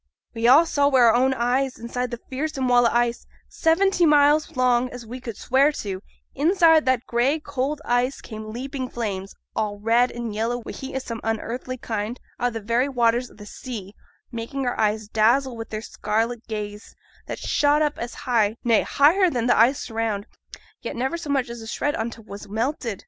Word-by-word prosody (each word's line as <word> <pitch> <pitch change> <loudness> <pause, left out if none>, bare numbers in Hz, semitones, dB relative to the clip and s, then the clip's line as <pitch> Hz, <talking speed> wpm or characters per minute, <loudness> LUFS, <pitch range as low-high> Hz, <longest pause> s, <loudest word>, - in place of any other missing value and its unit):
We 230 0 0
all 290 +7 +7
saw 285 -3 +2
wi' 270 -2 +3
our 235 -2 +6
own 260 +2 +3
eyes, 255 +2 0
inside 245 +2 -3
that 240 -1 -8
fearsome 270 -1 -2
wall 245 -1 +5
o' - - 0
ice 240 0 0 0.2
seventy 355 +3 +2
miles 295 -1 +4
long, 250 0 +3
as 245 -2 -9
we 245 +3 -7
could 230 -4 -7
swear 270 +4 +3
to 195 -7 -5 0.3
inside 325 0 +4
that 255 -2 +2
gray, 255 +6 +1
cold 285 +1 -3
ice, 245 +2 +1
came 215 -1 -8
leaping 260 +2 -5
flames, 200 -5 -4 0.2
all 210 -1 -1
red 230 +4 +3
and 235 -2 -5
yellow 225 +3 -1
wi' 240 - -8
heat 265 0 -7
o' - - +1
some 230 -4 -5
unearthly 235 +3 -3
kind 225 0 -4 0.2
out 245 -1 -1
o' - - -2
th' - - -16
very 235 +6 +1
waters 240 -1 +1
o' - - -18
the 210 - -11
sea; 210 -3 -8 0.4
making 240 +4 -4
our 245 - -1
eyes 215 0 +1
dazzle 235 +5 +2
wi' 225 0 -6
their 215 0 -5
scarlet 225 +2 -2
blaze, 210 -1 -6 0.3
that - - -4
shot 295 +1 +2
up 295 -1 -1
as 235 +1 -5
high, 225 -4 +2
nay, 230 -3 +4
higher 350 +7 +4
than 240 -7 -1
th' - - +4
ice 240 +2 +2
around, 225 -3 -2 0.6
yet - - -5
never 265 +7 -1
so 330 -3 -6
much 275 -3 +1
as 235 -1 -8
a 225 - -9
shred 290 +5 -1
on 225 +1 -2
't 225 -1 -12
was 200 -1 -9
melted. 230 -1 -2
240 Hz, 200 wpm, -23 LUFS, 225-270 Hz, 0.6 s, all